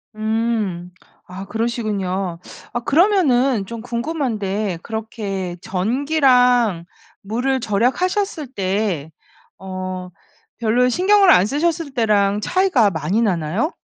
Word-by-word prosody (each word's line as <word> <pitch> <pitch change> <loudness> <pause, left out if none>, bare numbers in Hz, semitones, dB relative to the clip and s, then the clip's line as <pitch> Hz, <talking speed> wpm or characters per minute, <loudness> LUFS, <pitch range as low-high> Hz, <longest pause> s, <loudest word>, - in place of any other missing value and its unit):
음. 215 -5 -2 0.4
아 190 +2 -8
그러시군요. 195 -6 -2 0.3
아 240 - -1
그러면은 275 - +3
좀 230 -1 -7
궁금한데 225 - -2
그렇게 205 -5 -5
전기랑 245 - +2 0.4
물을 250 +6 -1
절약하셨을 300 - 0
때 190 -6 -2 0.5
어 185 -1 -5 0.5
별로 240 +2 +2
신경을 385 - +4
안 180 +2 +5
쓰셨을 305 +3 -1
때랑 210 -3 +2
차이가 350 - +2
많이 165 +8 -1
나나요? 185 - 0
220 Hz, 220 characters per minute, -20 LUFS, 190-260 Hz, 0.5 s, 안